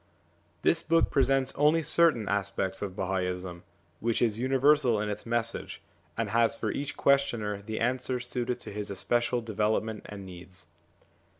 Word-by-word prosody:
This -, -, +4 dB
book 165 Hz, +1 st, +2 dB
presents 135 Hz, -1 st, +2 dB
only 150 Hz, +3 st, +3 dB
certain 155 Hz, -11 st, +3 dB
aspects 95 Hz, -1 st, -1 dB
of 95 Hz, -2 st, -4 dB
Bahaism, 90 Hz, -2 st, -3 dB, 0.4 s
which 115 Hz, 0 st, 0 dB
is 115 Hz, -2 st, +1 dB
universal 130 Hz, -2 st, +3 dB
in 105 Hz, 0 st, -2 dB
its 105 Hz, +2 st, -5 dB
message, 115 Hz, 0 st, -2 dB, 0.4 s
and 110 Hz, -3 st, -1 dB
has 115 Hz, 0 st, +2 dB
for -, -, -2 dB
each 140 Hz, 0 st, -4 dB
questioner 120 Hz, -7 st, +1 dB
the 110 Hz, +2 st, -5 dB
answer 125 Hz, +1 st, 0 dB
suited 125 Hz, 0 st, -3 dB
to -, -, -8 dB
his 105 Hz, 0 st, -4 dB
especial 120 Hz, +5 st, 0 dB
develop 110 Hz, -1 st, 0 dB
ment 110 Hz, -1 st, -6 dB
and 100 Hz, -2 st, -8 dB
needs. 90 Hz, 0 st, -10 dB
115 Hz, 155 wpm, -29 LUFS, 100-130 Hz, 0.4 s, This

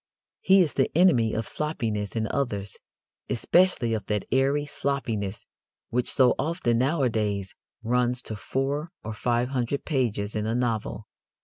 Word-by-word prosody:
He 190 Hz, 0 st, +5 dB
is 160 Hz, -5 st, +1 dB
the 135 Hz, -, +2 dB
enemy 130 Hz, -12 st, +4 dB
of 110 Hz, 0 st, -2 dB
sloppiness 115 Hz, -10 st, -3 dB
in 110 Hz, -1 st, 0 dB
others 105 Hz, -8 st, -2 dB, 0.5 s
especially 130 Hz, -3 st, +2 dB
of 105 Hz, -3 st, -3 dB
that 105 Hz, -1 st, -1 dB
airy 135 Hz, +3 st, +2 dB
sloppiness 115 Hz, -9 st, -3 dB, 0.5 s
which 125 Hz, +1 st, +1 dB
so 130 Hz, -2 st, +5 dB
often 150 Hz, -8 st, 0 dB
nowadays 110 Hz, -, 0 dB, 0.3 s
runs 125 Hz, +1 st, +1 dB
to 110 Hz, -, -5 dB
four 140 Hz, +8 st, -2 dB
or 110 Hz, -, -5 dB
five 120 Hz, +2 st, 0 dB
hundred 130 Hz, +1 st, -2 dB
pages 115 Hz, -8 st, -1 dB
in 105 Hz, 0 st, -1 dB
a 115 Hz, -, 0 dB
novel. 115 Hz, -3 st, -2 dB
120 Hz, 140 wpm, -26 LUFS, 110-140 Hz, 0.5 s, He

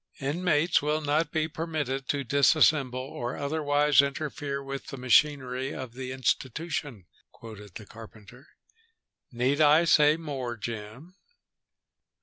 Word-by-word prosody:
"'Inmates 155 Hz, +3 st, +1 dB
will 150 Hz, +1 st, 0 dB
not 150 Hz, +1 st, 0 dB
be 155 Hz, 0 st, 0 dB
permitted 150 Hz, -5 st, -4 dB
to 140 Hz, -1 st, -1 dB
disassemble 140 Hz, 0 st, +3 dB
or 130 Hz, -2 st, -5 dB
otherwise 145 Hz, -1 st, +2 dB
interfere 140 Hz, 0 st, -4 dB
with 135 Hz, 0 st, -7 dB
the 135 Hz, -, -7 dB
machinery 130 Hz, 0 st, +1 dB
of 130 Hz, -3 st, -7 dB
the 130 Hz, 0 st, -6 dB
institution,'" 130 Hz, -, -3 dB, 0.3 s
quoted 105 Hz, -4 st, -12 dB
the 110 Hz, -, -9 dB
carpenter. 115 Hz, +4 st, -14 dB, 0.8 s
"Need 130 Hz, +5 st, 0 dB
I 155 Hz, +3 st, +5 dB
say 150 Hz, -1 st, +5 dB
more, 135 Hz, -7 st, -5 dB
Jim?" 115 Hz, -, -8 dB
140 Hz, 120 wpm, -27 LUFS, 125-150 Hz, 0.8 s, I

